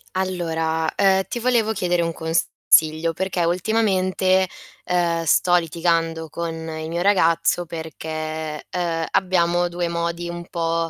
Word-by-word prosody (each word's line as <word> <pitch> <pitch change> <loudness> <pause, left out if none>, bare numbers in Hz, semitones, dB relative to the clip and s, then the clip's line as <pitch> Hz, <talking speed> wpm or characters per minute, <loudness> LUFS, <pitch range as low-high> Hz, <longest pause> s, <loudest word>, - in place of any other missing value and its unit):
Allora, 165 -4 -1
uhm, 190 -1 +4
ti 240 - -3
volevo 235 -2 +2
chiedere 180 -4 0
un 165 0 0
consiglio 160 0 +2
perché 185 0 -1
ultimamente, 185 0 +2 0.5
uhm, 170 -2 +1
sto 175 +3 +3
litigando 165 -1 0
con 165 +2 -4
il 160 -1 -6
mio 170 +1 -2
ragazzo 175 -2 +2
perché, 155 -1 -5
uhm, 165 -2 -1
abbiamo 175 -2 +2
2 175 0 -2
modi 170 0 -3
un 175 0 -6
po' 165 -1 -1
170 Hz, 125 wpm, -22 LUFS, 165-180 Hz, 0.5 s, uhm